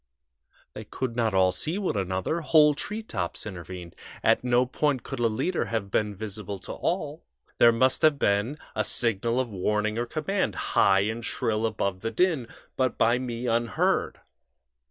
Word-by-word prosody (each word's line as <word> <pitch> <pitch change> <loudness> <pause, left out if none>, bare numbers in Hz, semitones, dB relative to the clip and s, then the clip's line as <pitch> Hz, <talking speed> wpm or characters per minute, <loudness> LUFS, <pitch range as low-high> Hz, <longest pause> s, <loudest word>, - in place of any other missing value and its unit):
They - - -7
could 130 -3 -4
not 115 -4 +1
all 95 -1 +4
see 155 - -2
one 200 - -1
another 95 - -1
whole 150 -1 +5
treetops 145 - -4
intervened. 90 -3 -8 0.3
At - - +3
no 125 0 +3
point 135 +1 0
could 135 - -6
a 120 - +3
leader 135 +11 -1
have 110 -4 -3
been 105 -1 0
visible 105 -1 -6
to - - -8
all. 160 -3 -3 0.4
There 120 - +8
must 130 +3 +2
have 155 -2 +4
been 105 +6 +1 0.2
a - - +1
signal 115 +1 0
of 125 -3 -2
warning 105 +3 0
or 120 - -2
command, 175 +9 -1 0.2
high 95 0 +5
and 110 +3 -2
shrill 110 0 0
above 100 -3 -2
the 115 - -3
din, 150 -1 +1 0.3
but 130 -2 0
by 120 +2 +3
me 120 -1 -4
unheard. 115 0 0
115 Hz, 165 wpm, -26 LUFS, 105-135 Hz, 0.4 s, There